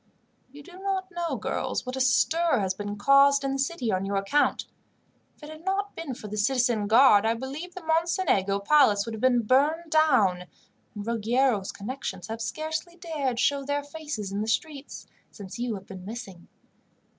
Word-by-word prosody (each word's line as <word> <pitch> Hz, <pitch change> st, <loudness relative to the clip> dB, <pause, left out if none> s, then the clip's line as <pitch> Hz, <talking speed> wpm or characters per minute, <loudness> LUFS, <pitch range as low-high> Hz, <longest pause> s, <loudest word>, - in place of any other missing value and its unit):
"You 290 Hz, +1 st, -12 dB
do 360 Hz, +4 st, -13 dB
not 380 Hz, -1 st, -3 dB
know, 345 Hz, -1 st, -2 dB
girls, -, -, -3 dB
what 255 Hz, +1 st, -4 dB
a 265 Hz, -, -2 dB
stir 320 Hz, +3 st, +3 dB
has 190 Hz, -2 st, 0 dB
been 205 Hz, +1 st, -5 dB
caused 275 Hz, +5 st, +5 dB
in 275 Hz, -, -1 dB
the 270 Hz, -, -3 dB
city 270 Hz, -4 st, -1 dB
on 185 Hz, 0 st, 0 dB
your 200 Hz, +1 st, -2 dB
account. 195 Hz, +10 st, +1 dB, 0.7 s
If -, -, -22 dB
it 300 Hz, -, -9 dB
had 310 Hz, +1 st, -12 dB
not 395 Hz, +2 st, -2 dB
been 300 Hz, -6 st, -5 dB
for 215 Hz, -, -9 dB
the 210 Hz, +1 st, -6 dB
citizen 235 Hz, -1 st, +1 dB
guard, 220 Hz, -2 st, +6 dB
I 225 Hz, +1 st, +1 dB
believe 280 Hz, +9 st, -7 dB
the 370 Hz, -, -8 dB
Mocenigo 320 Hz, -, +1 dB
Palace 205 Hz, -2 st, +4 dB
would 230 Hz, -, -6 dB
have 220 Hz, -, -7 dB
been 245 Hz, -2 st, +3 dB
burned 300 Hz, +8 st, +2 dB
down; 235 Hz, -, +3 dB, 0.5 s
and 205 Hz, -1 st, -6 dB
Ruggiero's 230 Hz, -1 st, +1 dB
connections 205 Hz, -3 st, -6 dB
have 225 Hz, +1 st, -5 dB
scarcely 315 Hz, +6 st, -4 dB
dared 310 Hz, -8 st, -3 dB
to -, -, +1 dB
show 280 Hz, -1 st, +1 dB
their 285 Hz, +1 st, -2 dB
faces 285 Hz, -9 st, -6 dB
in 200 Hz, +1 st, -2 dB
the 215 Hz, -, -3 dB
streets, 280 Hz, +5 st, -3 dB, 0.2 s
since 200 Hz, +2 st, -10 dB
you 240 Hz, -2 st, -2 dB
have 195 Hz, -1 st, -9 dB
been 190 Hz, -2 st, -10 dB
missing. 195 Hz, -4 st, -9 dB
260 Hz, 190 wpm, -26 LUFS, 210-310 Hz, 0.7 s, guard